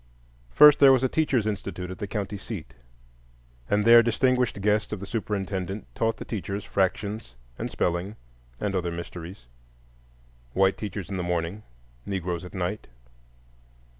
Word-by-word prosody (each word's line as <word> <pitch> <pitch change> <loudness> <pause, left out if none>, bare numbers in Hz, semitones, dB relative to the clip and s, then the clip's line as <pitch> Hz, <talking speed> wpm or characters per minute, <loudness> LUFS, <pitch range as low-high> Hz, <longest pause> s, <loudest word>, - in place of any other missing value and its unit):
First, 150 - +8
there 140 -1 +8
was 130 -1 +4
a - - +4
Teachers' 130 -6 +1
Institute 95 -3 -4
at 95 - -8
the 105 - -3
county 100 0 -3
seat; 95 - -7 1.0
and 105 0 +2
there 115 0 +9
distinguished 125 0 +1
guests 105 +1 +1
of 105 - -3
the 100 - -6
superintendent 100 -2 -3
taught 115 0 0
the - - -7
teachers 100 -2 -4
fractions 100 - -2 0.2
and - - -3
spelling 90 +4 -1 0.4
and 100 - -1
other 90 -2 -1
mysteries,—white 85 -1 -8 1.3
teachers 100 -2 -6
in 95 - -2
the - - -1
morning, 85 +3 -2 0.5
Negroes 90 -3 -3
at 90 - -10
night. 95 +3 -3
100 Hz, 140 wpm, -26 LUFS, 90-110 Hz, 1.3 s, there